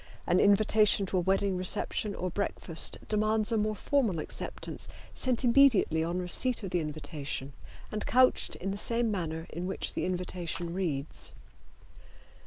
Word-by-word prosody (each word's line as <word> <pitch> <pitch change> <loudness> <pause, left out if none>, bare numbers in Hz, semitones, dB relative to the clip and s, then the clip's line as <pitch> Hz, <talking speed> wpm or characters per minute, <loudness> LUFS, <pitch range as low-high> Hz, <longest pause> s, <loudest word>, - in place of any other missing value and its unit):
An 180 +1 +3
invitation 205 0 +4
to 190 - -2
a - - +1
wedding 195 +1 +1
reception 185 +3 0
or 180 0 -3
breakfast 170 -3 -3
demands 215 +1 +1
a 225 - +2
more 215 0 0
formal 235 - 0
acceptance 155 - -5 0.3
sent 255 -1 +1
immediately 235 - +4
on 170 +2 -2
receipt 215 +7 +3
of 190 - -5
the 175 - +1
invitation 150 -3 -5 0.4
and 215 - -3
couched 255 +2 +3
in 195 +2 -4
the 200 - -4
same 230 +1 0
manner 165 -4 -3
in 175 +2 -4
which 190 - -2
the - - -2
invitation 175 -2 -3
reads. 155 -7 -3
190 Hz, 150 wpm, -30 LUFS, 170-215 Hz, 0.4 s, invitation